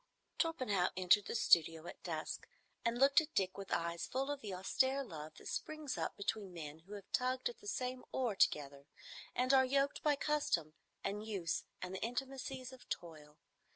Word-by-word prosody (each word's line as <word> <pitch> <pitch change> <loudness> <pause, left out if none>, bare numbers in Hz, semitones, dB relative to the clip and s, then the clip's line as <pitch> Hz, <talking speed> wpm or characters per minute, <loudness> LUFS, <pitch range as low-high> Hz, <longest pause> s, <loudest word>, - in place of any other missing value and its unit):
Torpenhow 230 - +2
entered 185 +3 +5
the - - -3
studio 165 -5 +5
at - - -8
dusk, 160 -3 -4 0.4
and 235 +1 +1
looked 275 +4 +7
at 315 0 -9
Dick 185 -1 +2
with 195 -1 -7
eyes 170 0 0
full 270 +2 -1
of 290 -1 -4
the 210 - -5
austere 260 +9 +2
love 155 - -8
that - - -14
springs 310 -3 -3
up - - -2
between 200 -1 -2
men 155 -3 -7
who 190 +6 -12
have 200 -2 -9
tugged 255 - +1
at 480 - -10
the 415 - -12
same 255 -7 -2
oar 245 -6 0
together 140 -5 +2 0.5
and 255 +2 +3
are 265 -1 +8
yoked 275 +2 +2
by 295 -1 +4
custom 280 - +1 0.3
and 210 +2 -2
use 190 -6 -1 0.2
and 180 +1 -4
the 190 - -4
intimacies 260 +1 -3
of 255 - -14
toil. 155 -3 -6
210 Hz, 185 wpm, -37 LUFS, 170-265 Hz, 0.5 s, are